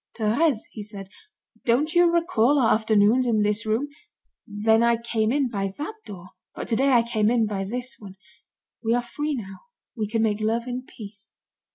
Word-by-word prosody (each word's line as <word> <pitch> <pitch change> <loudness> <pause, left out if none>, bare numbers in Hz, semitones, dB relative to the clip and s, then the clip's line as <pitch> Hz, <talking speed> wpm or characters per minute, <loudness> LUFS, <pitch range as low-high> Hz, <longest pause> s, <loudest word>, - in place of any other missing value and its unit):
"Thérèse," 230 +4 +2
he 215 - -8
said, 200 -2 -8 0.5
"don't 280 +7 +1
you 345 -1 +5
recall 315 -6 +2
our 240 -5 +4
afternoons 220 +3 +3
in 215 -3 +2
this 210 +2 -1
room? 225 +7 0 0.6
Then 220 +2 +2
I 235 0 +3
came 225 -1 -1
in 275 0 +1
by 195 -4 -3
that 300 +8 -4
door, 185 -3 -10 0.3
but - - -6
today 265 +5 +2
I 235 -2 +5
came 220 -2 +1
in 235 -2 +2
by 200 -2 -3
this 245 +5 -3
one. 195 -3 -11 0.7
We 230 +1 +2
are 245 - 0
free 295 +5 -3
now. 195 -6 -7 0.4
We 215 -3 -2
can 225 +1 0
make 215 -1 0
love 225 +2 0
in 255 +1 -5
peace." 205 -2 -11
225 Hz, 185 wpm, -24 LUFS, 210-250 Hz, 0.7 s, you